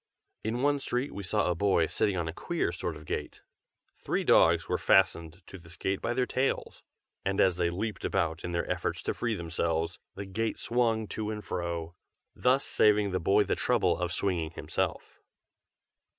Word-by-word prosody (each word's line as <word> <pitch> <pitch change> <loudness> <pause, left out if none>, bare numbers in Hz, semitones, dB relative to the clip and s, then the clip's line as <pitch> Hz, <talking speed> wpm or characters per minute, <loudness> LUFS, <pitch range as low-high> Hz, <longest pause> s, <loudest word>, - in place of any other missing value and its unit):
In 120 +4 -2
one 145 0 +3
street 130 0 -2
we 100 - -5
saw 90 - 0
a 90 - +2
boy 95 -1 +2
sitting 95 +3 0
on 85 -2 -1
a 80 - -4
queer - - -1
sort - - -4
of 75 +1 -11
gate. - - -5 0.6
Three - - -1
dogs - - +5
were - - 0
fastened 85 +3 +2
to 95 - -10
this 85 -1 -11
gate 95 0 -1
by 120 - -1
their 130 0 +2
tails, 130 +2 -1 0.4
and 95 0 -1
as 90 -2 +4
they 85 -1 +2
leaped 105 +5 -4
about 80 0 -1
in 85 - -3
their 85 0 -1
efforts - - -2
to - - -1
free 120 -2 -1
themselves, 85 -1 -2 0.2
the 100 - -5
gate 110 +4 -2
swung 115 -2 +1
to 110 -1 -3
and 105 -1 -5
fro, 85 -1 -3 0.4
thus 130 +2 +2
saving 105 -1 +3
the 95 - 0
boy 100 +4 +4
the - - -1
trouble - - +2
of 90 +1 -2
swinging 90 -4 -1
himself. 85 - -3
95 Hz, 185 wpm, -29 LUFS, 85-110 Hz, 0.6 s, dogs